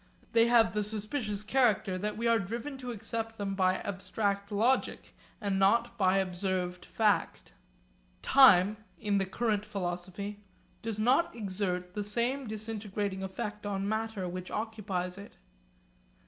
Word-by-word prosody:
They 230 0 +5
have 230 -6 +5
the 210 - +1
suspicious 210 0 -3
character 215 -5 +2
that 210 +3 -3
we 230 - -2
are 230 -1 +4
driven 235 +8 -4
to 250 -1 -6
accept 225 0 -4
them 200 -2 -2
by 185 -1 +2
abstract 200 +1 -2
logic 230 +6 +1 0.3
and 200 -3 -1
not 235 +4 +3
by 190 -3 +3
observed 185 -1 -2
fact. 215 -2 0 0.7
Time 215 -6 +7 0.2
(in 205 -2 +1
the 195 - -1
current 210 +1 0
philosophy) 200 +1 -4 0.4
does 225 -2 -3
not 250 +9 +3
exert 185 -4 -2
the 210 - -2
same 240 +6 0
disintegrating 210 -2 -4
effect 210 +2 -5
on 200 -1 -2
matter 220 -3 -2
which 180 +1 -6
occupies 200 -4 -3
it. 200 - -12
210 Hz, 135 wpm, -31 LUFS, 190-225 Hz, 0.7 s, Time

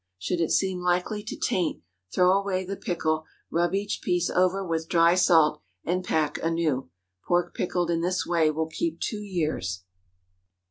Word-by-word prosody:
Should 170 - -2
it 165 - +1
seem 190 -2 +1
likely 180 +4 0
to 215 - -6
taint, 170 - -1 0.3
throw 180 0 +4
away 195 -1 0
the 195 +2 -4
pickle, 160 -4 -1 0.3
rub 175 +2 +1
each 200 +1 -2
piece 180 -1 0
over 185 +2 +2
with 165 -2 -2
dry 170 0 +5
salt, 165 -4 +4 0.2
and 180 +2 -1
pack 155 -4 0
anew. 165 - 0 0.4
Pork 175 0 +1
pickled 175 -1 -1
in 165 0 0
this 180 +2 0
way 165 -3 +3
will 160 +1 -1
keep 320 - -3
two 215 -3 -3
years. 155 - -2
175 Hz, 165 wpm, -26 LUFS, 160-185 Hz, 0.4 s, dry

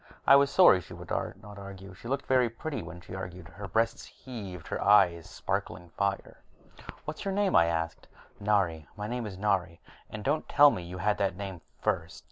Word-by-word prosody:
I - - +8
was 140 0 +5
sorry 140 - +6
she - - -11
would - - -10
not 105 -1 -4
argue. 95 -1 -9
She 95 - -11
looked 135 +2 -2
very 130 -2 +3
pretty 140 +6 -5
when 85 - -9
she 90 - -11
argued, 90 -2 -7
her 100 +5 -8
breasts 115 +5 0
heaving, 105 -8 -8
her - - -3
eyes 90 -5 +4
sparkling 85 +1 -4
fire. 100 +3 -2 0.7
"What's - - -5
your 195 -1 -2
name?" 200 -2 +2
I 85 - +6
asked. 80 0 -2 0.3
"Nari. 95 -8 +1
My 105 - -4
name 120 +1 -3
is 95 -3 -8
Nari. 95 -4 0 0.3
And 105 -1 -7
don't 150 +5 0
tell 145 0 +7
me 90 - -4
you 90 +1 -7
had 105 +3 0
that 95 -2 0
name 95 -3 -6 0.2
first!" - - -1
100 Hz, 195 wpm, -29 LUFS, 90-115 Hz, 0.7 s, I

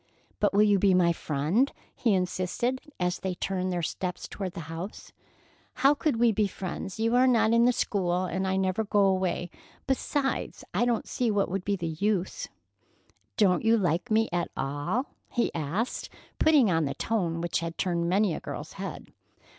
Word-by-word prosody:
"But 205 - +3
will 205 +1 +5
you 205 -2 +4
be 190 -1 +4
my 170 -2 +4
friend?" 165 - 0 0.2
he 225 -5 +2
insisted, 185 +8 -1 0.2
as 180 0 0
they 190 -1 -3
turned 185 0 -2
their 175 -1 -2
steps 180 +2 -3
toward 190 -3 -5
the 170 - -6
house. 165 +5 -7 0.6
"How 275 +2 +5
could 285 -4 0
we 235 -1 +5
be 215 -1 +1
friends? 190 +1 -6
You 230 +1 +1
are 255 +1 +5
not 230 -3 +4
in 235 0 +5
the 250 - +5
school, 185 -6 0
and 190 +1 -2
I 190 - +1
never 190 +3 +1
go 205 -1 +3
away. 185 -2 0 0.3
Besides, 270 +1 -1
I 240 - +2
don't 240 -2 0
see 245 -2 0
what 205 -2 +1
would 195 0 -2
be 200 +1 0
the 175 -3 -4
use." 200 -3 0 0.9
"Don't 185 -4 +3
you 225 +1 +4
like 180 +3 0
me 225 +1 +3
at 175 0 0
all?" 145 - -1 0.2
he 240 - 0
asked, 170 - -2 0.3
putting 290 -10 +5
on 165 -2 +2
the 140 -1 -3
tone 175 -4 -1
which 170 0 -1
had 165 0 -5
turned 170 -2 0
many 195 0 +2
a - - -3
girl's - - -7
head. - - -7
190 Hz, 185 wpm, -28 LUFS, 175-225 Hz, 0.9 s, will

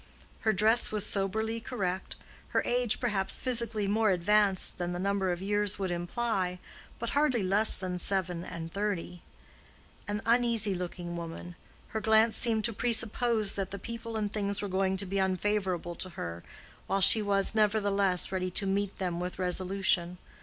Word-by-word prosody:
Her 220 - +1
dress 220 +4 +4
was 210 -2 0
soberly 220 +3 -1
correct, 195 -6 -4 0.3
her - - 0
age, 245 -2 0
perhaps, 205 -6 -1
physically 235 -4 -1
more 215 +2 +2
advanced 195 +1 +2
than 175 0 -2
the 175 - -4
number 195 -1 0
of 175 +1 -4
years 205 0 0
would 190 -2 -2
imply, 180 +1 -2 0.4
but 235 - -4
hardly 285 -7 +1
less 200 +4 +3
than 180 -2 -4
seven 180 -2 -2
and 165 -1 -7
thirty. 195 -4 -3 0.9
An 210 +1 -3
uneasy 230 -3 +3
looking 175 -1 -5
woman: 170 +1 -7 0.4
her 220 - -3
glance 220 +1 +4
seemed 225 -3 +3
to 230 - -1
presuppose 225 -1 +2
that 195 -2 -3
the 200 - -6
people 230 +2 -6
and 210 -2 -2
things 200 -2 -2
were 205 - -3
going 190 0 0
to 200 - +2
be 195 +1 -2
unfavorable 190 -2 -1
to 185 +2 -5
her, 85 - -6 0.5
while 195 0 0
she 215 +3 +7
was, 200 -1 +3
nevertheless, 200 -4 +1
ready 185 -1 -2
to 195 +3 0
meet 200 0 -1
them 175 -3 -3
with 180 +1 -5
resolution. 180 -1 +1
200 Hz, 165 wpm, -29 LUFS, 185-220 Hz, 0.9 s, she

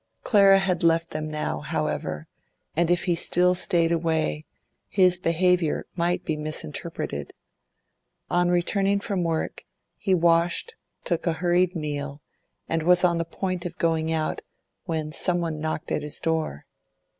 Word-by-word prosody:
Clara 195 -3 +6
had 185 -3 0
left 165 0 +2
them 155 0 -4
now, 150 0 -3
however, 75 - -3 0.5
and 170 +1 +2
if 175 0 +2
he 180 - +1
still 180 +1 +3
stayed 170 -2 +2
away, 160 - 0 0.4
his 185 -2 +4
behaviour 175 -1 +1
might 175 0 0
be 155 - -1
misinterpreted. 150 - -4 0.9
On 175 0 +2
returning 195 +3 +2
from 200 -2 -2
work, 165 -1 -2 0.3
he 190 -3 +1
washed, 170 - +2 0.3
took 170 0 -2
a 165 - +2
hurried 175 +2 +1
meal, 145 -2 -4 0.5
and 165 0 0
was 180 +2 +4
on 170 -2 +3
the 165 - -1
point 185 +1 -3
of 175 -1 -6
going 160 -1 0
out 155 -1 -1 0.4
when 160 -3 -3
someone 170 -1 +1
knocked 155 +1 -4
at - - 0
his 150 0 -4
door. 160 - -2
170 Hz, 145 wpm, -25 LUFS, 160-180 Hz, 0.9 s, Clara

